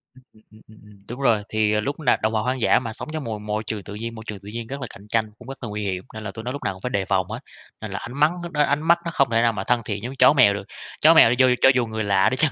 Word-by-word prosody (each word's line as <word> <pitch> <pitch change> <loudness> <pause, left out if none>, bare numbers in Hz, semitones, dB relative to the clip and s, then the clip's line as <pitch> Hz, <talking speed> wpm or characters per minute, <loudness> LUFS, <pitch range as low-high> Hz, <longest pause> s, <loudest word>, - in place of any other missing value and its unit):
Ừm, 130 - -19
ừm, 110 - -23
ừm, 110 0 -18
ừm, 110 0 -18
ừm, 105 -1 -17
đúng 120 +3 -7
rồi, 115 -6 +2
thì, 110 -1 +1
à, 105 - +2
lúc 140 +8 -3
nào 140 -6 +2
động 110 +1 +1
vật 110 - +1
hoang 125 +3 -2
dã - - +4
mà 115 -3 -6
sống - - -6
trong 155 -2 -3
mồi 110 -3 -4
môi 105 +1 -3
trường 105 -1 -5
tự 100 - -9
nhiên 115 +2 -6
môi 110 - -9
trường 105 -2 -6
tự 100 +1 -11
nhiên 115 -1 -5
rất 140 +1 -6
là 125 - -4
cạnh 100 - -14
tranh 115 0 +1
cũng - - -14
rất 135 -1 -9
là 115 - -4
nguy 105 0 -4
hiểm. 95 -2 -3
Nên 110 0 -7
là 100 - -5
tụi 110 - -9
nói 125 - -3
lúc 140 - -7
nào - - -1
cũng 95 - -15
phải 125 - -3
đề 100 -5 -1
phòng 95 -2 0
hết, 110 +2 -5 0.4
nên 110 - -6
là 100 - -4
ánh 120 - -8
mắng 150 +3 +4
lúc 170 - -6
đó 150 - 0
ánh 145 +1 0
mắt 170 +2 +4
nó 170 - -2
không 140 -4 +2
thể 115 - +3
nào 115 -1 +2
mà 95 - -4
thân 120 +2 +1
thiện 100 0 -4
giống 130 +3 -5
chó 135 - +6
mèo 125 -8 +5
được, 100 - -5 0.4
chó 160 +2 +7
mèo 125 -7 +6
cho 130 0 +5
cho - - +7
dù 125 -2 +2
người 110 0 -3
lạ 100 0 +3
đi 130 - -3
chăng 155 0 +3
110 Hz, 360 wpm, -23 LUFS, 105-130 Hz, 0.4 s, chó